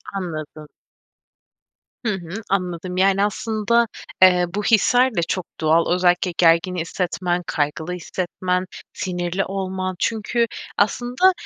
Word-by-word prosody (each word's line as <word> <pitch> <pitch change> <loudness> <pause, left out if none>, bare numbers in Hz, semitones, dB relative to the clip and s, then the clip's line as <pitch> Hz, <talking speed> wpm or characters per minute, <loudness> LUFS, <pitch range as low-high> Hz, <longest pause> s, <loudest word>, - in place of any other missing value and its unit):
Anladım. 155 -4 -5 1.4
Hı 215 - +1
hı, 190 +3 -6
anladım, 180 -1 -2
yani, 195 +1 +3
aslında, 220 +2 +1 0.3
eee, 180 -1 +7
bu 210 - -1
hisler 245 +3 +4
de 170 - +2
çok 185 +1 -2 0.2
doğal. 160 +2 +3
Özellikle 180 0 +2
gergin 170 +2 +4
hissetmen, 175 +1 -2
kaygılı 155 +4 -2
hissetmen, 180 +1 -2 0.3
sinirli 180 +1 -2
olman. 185 -1 -3
Çünkü 230 +1 0 0.3
aslında, 245 - +3
185 Hz, 110 wpm, -22 LUFS, 175-205 Hz, 1.4 s, eee